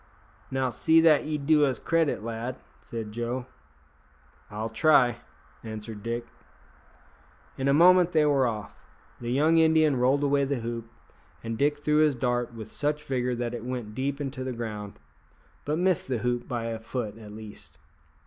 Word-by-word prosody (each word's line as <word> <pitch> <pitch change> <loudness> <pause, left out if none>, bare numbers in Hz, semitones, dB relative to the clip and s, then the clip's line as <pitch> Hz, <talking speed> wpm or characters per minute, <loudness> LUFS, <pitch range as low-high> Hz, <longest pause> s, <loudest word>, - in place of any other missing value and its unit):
"Now, 130 -1 -1
see 160 +6 +4
that 160 -3 +5
ye 155 0 -1
do 150 +1 +3
us 135 -4 +2
credit, 165 -6 0
lad," 115 +3 -4 0.2
said 115 -2 -6
Joe. 120 +3 -3 1.0
"I'll 105 +2 -4
try," 125 +1 +4 0.5
answered 110 -1 -7
Dick. 115 +2 -3 1.3
In 135 - -2
a 140 - +4
moment 180 +2 +6
they 155 -3 +3
were 140 -3 +3
off. 105 -3 -5 0.5
The 120 - -5
young 155 +5 +4
Indian 160 -2 +4
rolled 130 +4 +2
away 140 0 +2
the 135 -3 -1
hoop, 115 0 -5 0.5
and 115 0 -3
Dick 145 +4 0
threw 150 0 +2
his 155 -2 +4
dart 120 -1 -1
with 110 -2 -9
such 150 +1 -1
vigour 125 -3 -1
that 120 0 -3
it 120 -2 -5
went 120 -4 -5
deep 140 +4 -2
into 135 -2 -4
the 130 -1 -3
ground, 105 -3 -6 0.7
but 150 +2 0
missed 180 -1 +1
the 130 -2 -1
hoop 120 0 -1
by 120 -2 -3
a 115 -1 -3
foot 115 -1 -5
at 105 -2 -11
least. 105 -7 -11
125 Hz, 165 wpm, -27 LUFS, 115-145 Hz, 1.3 s, moment